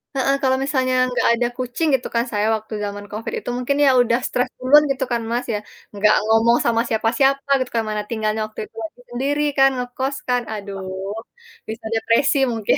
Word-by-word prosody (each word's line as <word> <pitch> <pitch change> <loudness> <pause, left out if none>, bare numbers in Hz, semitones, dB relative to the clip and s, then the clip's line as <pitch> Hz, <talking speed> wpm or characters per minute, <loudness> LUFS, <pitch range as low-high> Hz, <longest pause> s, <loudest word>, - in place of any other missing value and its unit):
heeh, 275 +1 +2
kalau 260 0 +3
misalnya 260 -2 0 0.2
nggak - - +1
ada 240 - +1
kucing, 255 +6 -2
gitu - - -3
kan, 235 0 +2
saya 210 0 0
waktu 220 0 -8
zaman 205 0 -6
Covid 215 +2 -5
itu, - - -7
mungkin 265 +3 -1
ya - - +6
udah 235 +1 +2
stres 250 - -1
duluan 285 +4 +6
gitu 265 -1 -1
kan, 235 -1 0
Mas, 245 +1 -1
ya. 210 - -1 0.3
Nggak 205 +1 +4
ngomong 225 +2 +4
sama 230 -1 +2
siapa-siapa 270 +6 +1
gitu 255 - -3
kan 225 - +2
mana 210 0 -1
tinggalnya 220 -1 -1
waktu 215 - -12
itu - - -40
masih 235 +3 -9
sendiri 280 +4 -1
kan, 270 0 +6
ngekos 260 +2 -3
kan, 245 0 +2
aduh, 200 -2 -6 0.9
bisa 220 0 -7
depresi 235 +6 +2
mungkin. 225 -3 +1
240 Hz, 195 wpm, -21 LUFS, 220-265 Hz, 0.9 s, ya